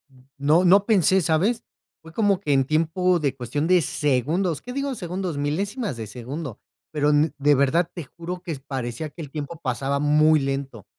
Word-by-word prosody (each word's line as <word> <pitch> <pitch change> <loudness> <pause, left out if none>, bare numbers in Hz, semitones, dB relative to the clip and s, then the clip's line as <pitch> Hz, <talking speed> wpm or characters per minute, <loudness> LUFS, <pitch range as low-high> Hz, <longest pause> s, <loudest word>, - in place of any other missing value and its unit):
mm, 130 - -20 0.2
no, 150 +6 +3
no 195 +3 +5
pensé, 190 -3 +4
¿sabes? 185 +8 +1 0.4
Fue 160 0 -13
como 200 0 +2
que 150 -7 -1
en 135 -1 +4
tiempo 165 +4 +1
de 140 -4 -1
cuestión 135 +4 -3
de 180 +1 +5
segundos, 150 +5 0
qué 250 - -7
digo 275 +1 -2
segundos, 180 - -4
milésimas 195 - -2
de 110 -1 -6
segundo. 125 +4 -7 0.3
Pero 150 -1 +1
n 150 +1 +3
de 145 +1 +4
verdad, 145 +6 +2
te 170 - -6
juro 170 +6 -7
que 170 -3 -4
parecía 130 +2 -4
que 165 - -13
el 145 - -9
tiempo 150 +2 -6
pasaba 135 0 -1
muy 155 +2 +4
lento. 135 -5 -4
155 Hz, 185 wpm, -24 LUFS, 140-180 Hz, 0.4 s, no